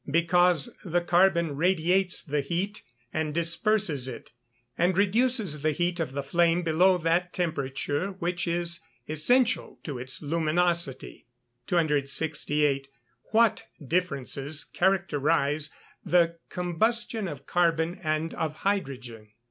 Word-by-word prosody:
_ -, -, -5 dB
Because 170 Hz, -1 st, +3 dB
the 175 Hz, 0 st, 0 dB
carbon 175 Hz, -3 st, +2 dB
radiates 180 Hz, +3 st, +2 dB
the 145 Hz, -1 st, -1 dB
heat, 180 Hz, +8 st, -3 dB, 0.3 s
and 155 Hz, -1 st, -2 dB
disperses 170 Hz, -, +1 dB
it, 125 Hz, -, -9 dB, 0.4 s
and 180 Hz, +3 st, +1 dB
reduces 205 Hz, -, +1 dB
the 155 Hz, 0 st, +1 dB
heat 175 Hz, +3 st, -1 dB
of 155 Hz, -5 st, -2 dB
the 140 Hz, 0 st, -3 dB
flame 170 Hz, +4 st, +2 dB
below 180 Hz, +3 st, +4 dB
that 175 Hz, +2 st, 0 dB
temperature 145 Hz, -1 st, -2 dB
which 180 Hz, -1 st, -3 dB
is 170 Hz, +1 st, -1 dB, 0.3 s
essential 235 Hz, -, +1 dB
to 140 Hz, -6 st, -5 dB
its 130 Hz, +1 st, -4 dB
luminosity. 165 Hz, -2 st, 0 dB, 0.4 s
268. 150 Hz, -2 st, +1 dB, 0.4 s
_What 225 Hz, -1 st, +3 dB, 0.3 s
differences 145 Hz, -3 st, -2 dB
characterise 155 Hz, -5 st, +1 dB, 0.3 s
the 170 Hz, -1 st, +2 dB
combustion 220 Hz, +5 st, -1 dB
of 145 Hz, -4 st, -8 dB
carbon 170 Hz, 0 st, +1 dB
and 155 Hz, +1 st, -1 dB
of 155 Hz, -1 st, -3 dB
hydrogen? 130 Hz, -, -2 dB
170 Hz, 115 wpm, -27 LUFS, 150-180 Hz, 0.4 s, below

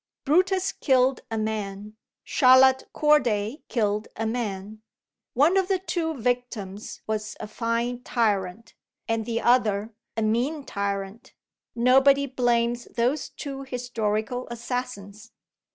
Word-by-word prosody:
Brutus 370 Hz, +5 st, +2 dB
killed 260 Hz, -1 st, +2 dB
a 225 Hz, -, -3 dB
man; 210 Hz, -1 st, -4 dB, 0.3 s
Charlotte 260 Hz, 0 st, +5 dB
Corday 255 Hz, -4 st, +2 dB
killed 210 Hz, -2 st, 0 dB
a 225 Hz, -, -3 dB
man. 215 Hz, -2 st, -4 dB, 0.5 s
One 305 Hz, +9 st, +4 dB
of 380 Hz, -1 st, +2 dB
the 385 Hz, -1 st, +2 dB
two 340 Hz, -3 st, -2 dB
victims 235 Hz, -5 st, -3 dB
was 215 Hz, 0 st, -3 dB
a -, -, -5 dB
fine 235 Hz, +2 st, -2 dB
tyrant, 210 Hz, -4 st, -1 dB, 0.3 s
and 225 Hz, -1 st, -1 dB
the 230 Hz, -1 st, -1 dB
other 225 Hz, -3 st, +2 dB, 0.2 s
a 225 Hz, -, +1 dB
mean 255 Hz, +7 st, 0 dB
tyrant. 200 Hz, +1 st, -4 dB, 0.4 s
Nobody 270 Hz, +3 st, +5 dB
blames 240 Hz, -2 st, 0 dB
those 255 Hz, +4 st, -1 dB
two 275 Hz, -2 st, -7 dB
historical 245 Hz, -2 st, -2 dB
assassins. 235 Hz, -3 st, -6 dB
235 Hz, 115 wpm, -25 LUFS, 215-260 Hz, 0.5 s, Charlotte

